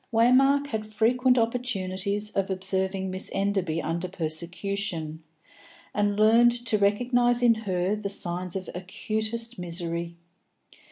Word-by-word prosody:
Waymark 265 +5 +4
had 220 -6 -3
frequent 240 +4 +2
opportunities 210 -4 -1
of 195 -1 -1
observing 190 0 -1
Miss 185 0 -5
Enderby 190 -5 -1
under 170 +3 -2
persecution, 170 0 -3 0.7
and 205 -1 0
learned 235 +2 +4
to 215 -2 +2
recognise 240 +4 +2
in 235 -1 +6
her 195 -3 -1
the 210 -1 -4
signs 180 -2 -2
of 185 -2 -4
acutest 215 +5 -3
misery. 170 -1 -1
200 Hz, 115 wpm, -26 LUFS, 185-230 Hz, 0.7 s, in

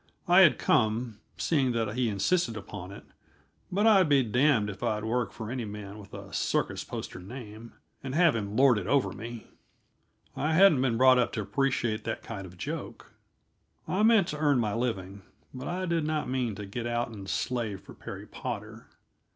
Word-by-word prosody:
I 175 +1 +6
had 180 -6 +7
come, 115 -3 +1 0.2
seeing 135 -6 +1
that 110 -2 -1
he 125 -1 0
insisted 115 - 0
upon 95 -3 -8
it, 100 - -10 0.7
but 200 +4 +1
I'd 195 -7 +6
be 140 -2 +5
damned 125 -1 +2
if 100 -2 -7
I'd 105 -1 -1
work 120 +2 -1
for 110 -1 -7
any 125 -2 -3
man 105 -1 -7
with 100 -1 -13
a - - -10
circus - - -1
poster - - -7
name, 110 +2 -10 0.3
and 135 0 -4
have 170 -5 +4
him 105 -2 -3
lord 130 -4 +5
it 95 - -6
over 140 +1 +2
me. 115 0 -8 0.9
I 155 +2 0
hadn't 165 -7 +6
been 120 -4 +1
brought 130 0 +6
up 120 - +1
to 110 - -2
appreciate 115 0 -1
that - - -4
kind 100 -4 -7
of 90 0 -15
joke. - - -6 0.7
I 190 - 0
meant 220 -4 +5
to 150 - -4
earn 145 -3 +3
my 110 -4 0
living, 100 -5 -3 0.3
but 130 - -6
I 185 +1 -2
did 170 -2 0
not 155 0 -1
mean 125 -4 -1
to 105 - -6
get 115 +4 -5
out 120 0 -1
and 100 -4 -9
slave 115 -5 -2
for - - -13
Perry - - -8
Potter. - - -7
120 Hz, 190 wpm, -28 LUFS, 105-140 Hz, 0.9 s, had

